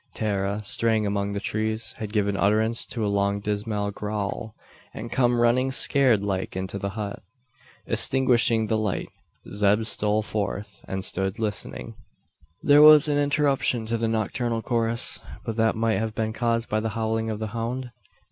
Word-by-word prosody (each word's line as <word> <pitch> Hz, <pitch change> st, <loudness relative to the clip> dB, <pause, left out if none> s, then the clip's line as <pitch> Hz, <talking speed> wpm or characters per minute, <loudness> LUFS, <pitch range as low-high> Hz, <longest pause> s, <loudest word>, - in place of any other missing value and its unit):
Tara, 100 Hz, -1 st, -1 dB
straying 110 Hz, +1 st, +1 dB
among 100 Hz, 0 st, -1 dB
the 100 Hz, -, -2 dB
trees, 110 Hz, +2 st, -2 dB
had 105 Hz, -2 st, -5 dB
given 100 Hz, -2 st, 0 dB
utterance 110 Hz, +3 st, +1 dB
to 115 Hz, -3 st, -3 dB
a -, -, 0 dB
long 100 Hz, 0 st, +1 dB
dismal 105 Hz, 0 st, -2 dB
"gowl," 105 Hz, +2 st, -4 dB, 0.4 s
and 115 Hz, +2 st, -7 dB
come 120 Hz, -2 st, +2 dB
running 120 Hz, +3 st, +3 dB
scared 130 Hz, -5 st, +3 dB
like 95 Hz, -2 st, -2 dB
into 95 Hz, +1 st, -4 dB
the 100 Hz, +2 st, -5 dB
hut. 100 Hz, -2 st, -4 dB, 0.6 s
Extinguishing 120 Hz, -3 st, +2 dB
the 110 Hz, 0 st, 0 dB
light, 105 Hz, -3 st, -2 dB, 0.4 s
Zeb 105 Hz, +2 st, +2 dB
stole 105 Hz, -1 st, 0 dB
forth, 100 Hz, -1 st, -4 dB
and 95 Hz, 0 st, -3 dB
stood 95 Hz, +3 st, -2 dB
listening. 110 Hz, -2 st, -2 dB, 0.7 s
There 145 Hz, 0 st, +6 dB
was 150 Hz, 0 st, +8 dB
an 145 Hz, -1 st, +1 dB
interruption 145 Hz, -5 st, +1 dB
to 115 Hz, +1 st, -1 dB
the 115 Hz, 0 st, 0 dB
nocturnal 115 Hz, +1 st, -1 dB
chorus; 115 Hz, -1 st, 0 dB, 0.3 s
but 115 Hz, -, -3 dB
that 115 Hz, 0 st, +2 dB
might 115 Hz, 0 st, +1 dB
have 110 Hz, 0 st, -3 dB
been 110 Hz, 0 st, -1 dB
caused 115 Hz, 0 st, 0 dB
by 110 Hz, -, 0 dB
the 110 Hz, +1 st, -2 dB
howling 110 Hz, 0 st, -1 dB
of 110 Hz, -, -3 dB
the 110 Hz, 0 st, -4 dB
hound? 120 Hz, +2 st, -3 dB
110 Hz, 165 wpm, -25 LUFS, 105-115 Hz, 0.7 s, was